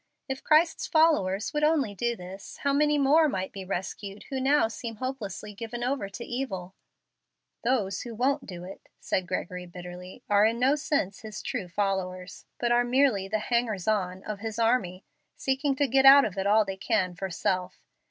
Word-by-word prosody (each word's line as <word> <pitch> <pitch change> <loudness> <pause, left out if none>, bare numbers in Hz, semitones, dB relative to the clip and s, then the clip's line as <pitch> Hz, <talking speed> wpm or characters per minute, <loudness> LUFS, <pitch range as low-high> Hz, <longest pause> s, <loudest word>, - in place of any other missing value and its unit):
If 265 -1 -5
Christ's 320 +2 +3
followers 220 - +2
would 300 0 0
only 300 -9 +2
do 235 +4 -1
this, 185 0 -10
how 280 -1 +2
many 295 +1 +3
more 295 +3 +4
might 190 -5 -3
be 195 - -7
rescued 195 +2 -5
who 265 -1 -2
now 275 -2 +4
seem 230 0 -6
hopelessly 215 -4 -5
given 230 +3 -6
over 250 -5 -1
to 200 +5 -7
evil!" 190 -8 -4 0.9
"Those 215 -6 0
who 235 -2 -7
won't 265 +4 0
do 180 -2 -7
it," 190 +2 -11
said 185 -1 -1
Gregory, 180 0 -4
bitterly, 180 +5 -10
"are 205 0 +4
in 230 +1 -1
no 260 +3 +3
sense 285 -10 -1
His 215 -1 -8
true 220 -9 -3
followers, 185 -1 -3
but 240 -1 0
are 240 0 +4
merely 245 -6 +2
the 215 +2 0
'hangers 220 -4 -1
on' 190 -3 0
of 210 -2 -5
His 220 0 -5
army, 225 -6 +1 0.3
seeking 270 +1 0
to 285 +1 +1
get 270 +2 +5
out 275 +1 +9
of 195 - -4
it 195 0 -1
all 215 +1 +5
they 195 -1 -5
can 185 -1 0
for 190 +2 -5
self. 185 +1 -2
220 Hz, 185 wpm, -27 LUFS, 190-265 Hz, 0.9 s, out